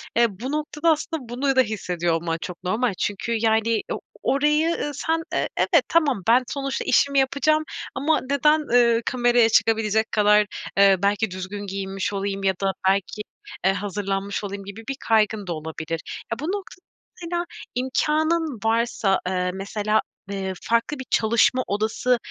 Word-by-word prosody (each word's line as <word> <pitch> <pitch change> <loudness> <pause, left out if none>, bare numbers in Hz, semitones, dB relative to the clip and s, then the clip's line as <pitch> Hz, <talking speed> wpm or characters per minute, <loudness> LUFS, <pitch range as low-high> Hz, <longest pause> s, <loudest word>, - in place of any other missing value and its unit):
eee, 235 0 +5
bu 260 +4 -4
noktada 305 +2 0
aslında 310 -4 -3
bunu 270 +3 0
da 260 - +6
hissediyor 180 -6 -1
olman 165 0 -1
çok 180 +1 -7
normal. 215 +4 0
Çünkü 205 +3 -2
yani, 225 0 +2
o - - -4 0.2
orayı, 300 +3 +2 0.2
ııı, 295 - -2
sen, 325 +3 -1
eee, - - 0
evet 330 -8 +3
"Tamam 290 - +2
ben 250 +2 +5
sonuçta 275 -1 -3
işimi 280 -1 +3
yapacağım 295 +3 +2 0.3
ama 310 +3 +1
neden, 300 +2 +4
ııı, 240 -4 +3
kameraya 240 -2 +3
çıkabilecek 220 -1 +2
kadar, 210 0 +4 0.3
eee, 200 -1 +7
belki 205 0 +1
düzgün 195 +2 -6
giyinmiş 195 0 -3
olayım 195 0 -3
ya 190 - +3
da 195 0 +2 0.2
belki, 195 +2 0 0.4
eee, 190 - +4
hazırlanmış 200 0 -3
olayım?" 200 0 -5
gibi 200 +3 -9
bir 270 - -2
kaygın 215 -2 +2
da 175 - -1
olabilir. 160 +1 -5 0.3
Ya, 230 - -2
bu - - -6
noktada 375 0 -5 0.4
mesela, 345 +1 -2 0.3
imkânın 305 +2 0
varsa, 225 -3 +1
eee, 180 -1 0
mesela, 210 +3 0 0.3
eee, 190 -1 -3
farklı 235 +5 0
bir 260 - -6
çalışma 235 +3 +3
odası, 220 +4 +1
225 Hz, 155 wpm, -23 LUFS, 195-275 Hz, 0.4 s, eee